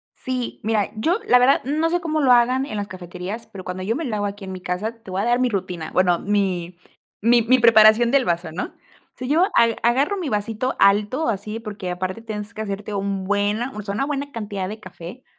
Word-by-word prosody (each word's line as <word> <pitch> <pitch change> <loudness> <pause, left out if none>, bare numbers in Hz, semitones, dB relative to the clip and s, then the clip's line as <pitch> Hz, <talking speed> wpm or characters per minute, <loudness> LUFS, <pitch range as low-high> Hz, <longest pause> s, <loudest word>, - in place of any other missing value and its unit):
Sí, 255 -2 -4
mira, 215 -1 0
yo 335 - +1
la 250 - +6
verdad, 255 +3 +4
no 310 +4 0
sé 350 - +1
cómo 315 -3 -1
lo 260 -3 +5
hagan 250 +2 +4
en 215 - -5
las 205 0 -2
cafeterías, 185 +4 -7
pero 190 -2 -10
cuando 180 0 -5
yo 225 +6 -1
me 325 - -3
lo 230 -5 -3
hago 205 0 -1
aquí 200 0 -6
en 190 - -6
mi 185 - -7
casa 180 +6 -3
te 190 - -11
voy 190 +1 -2
a - - -1
dar 240 +1 +2
mi 250 - +3
rutina, 180 -6 -4
bueno, 180 -2 +3
mi 185 -4 -1 0.4
mi 235 +2 +4
mi 255 +3 +4
preparación 230 0 +6
del 275 -2 +3
vaso, 170 -2 -1
¿no? 180 - -3
O - - -17
sea, 255 - -5
yo 325 +5 +4
ag 230 -1 +4
agarro 270 - +2
mi 335 -6 -3
vasito 220 +4 -2
alto 210 +9 +3
así, 215 +1 -3
porque 205 -4 -6
aparte 185 +4 -4
tienes 210 -1 -6
que 220 - -4
hacerte 205 0 -5
un 195 -1 -2
buena, 205 +6 0
o 210 - -4
sea, 200 0 -4
una 275 +5 0
buena 285 -1 -3
cantidad 205 -5 -4
de 215 +1 -7
café. 185 +5 -10
215 Hz, 235 wpm, -22 LUFS, 195-250 Hz, 0.4 s, la